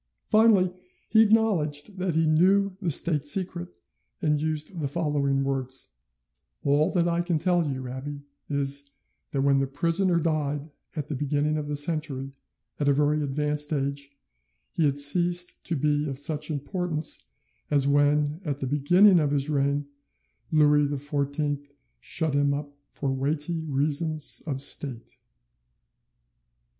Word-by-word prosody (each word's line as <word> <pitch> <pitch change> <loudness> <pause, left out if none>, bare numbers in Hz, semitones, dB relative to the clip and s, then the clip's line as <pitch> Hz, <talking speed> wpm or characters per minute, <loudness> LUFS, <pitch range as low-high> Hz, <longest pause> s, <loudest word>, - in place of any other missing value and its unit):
Finally 210 -5 +4 0.4
he 220 - +6
acknowledged 200 -6 +1
that 180 -3 -1
he 160 0 +3
knew 185 +5 +3
the 180 - -1
state 155 -1 +3
secret, 175 +2 0 0.4
and 150 -2 +1
used 155 +3 -3
the 145 - -1
following 140 -3 0
words: 135 -1 -3 0.7
"All 145 +4 +3
that 175 -2 +2
I 170 0 +1
can 175 -2 0
tell 175 -1 +1
you, 130 -1 -5
abbe, 140 +3 -7 0.3
is, 140 0 -1 0.4
that 135 -1 -1
when 140 -1 +3
the 135 - 0
prisoner 170 +5 +1
died 150 -2 -2 0.2
at 150 -3 -4
the 150 - -4
beginning 145 +2 0
of 150 -1 -3
the 150 - -2
century, 145 -3 -2 0.5
at 145 -1 +2
a - - +5
very 150 +2 +1
advanced 150 +1 -1
age, 140 -1 -3 0.5
he 160 - +1
had 140 -1 +1
ceased 175 +5 +2
to 170 - 0
be 150 +1 0
of 135 - -5
such 150 +2 -1
importance 155 +1 -3 0.4
as 140 -2 +3
when, 145 +2 +2
at 145 -4 -3
the 135 - -3
beginning 175 +8 +5
of 150 -2 +1
his 140 +1 -1
reign, 140 0 0 0.7
Louis 150 -2 +4
XIV 145 0 -2 0.4
shut 160 - -1
him 140 0 +2
up 145 0 -7
for 135 -1 -3
weighty 150 +4 -1
reasons 150 +2 0
of 135 -2 -1
state." 130 -5 -1
150 Hz, 145 wpm, -26 LUFS, 140-165 Hz, 0.7 s, he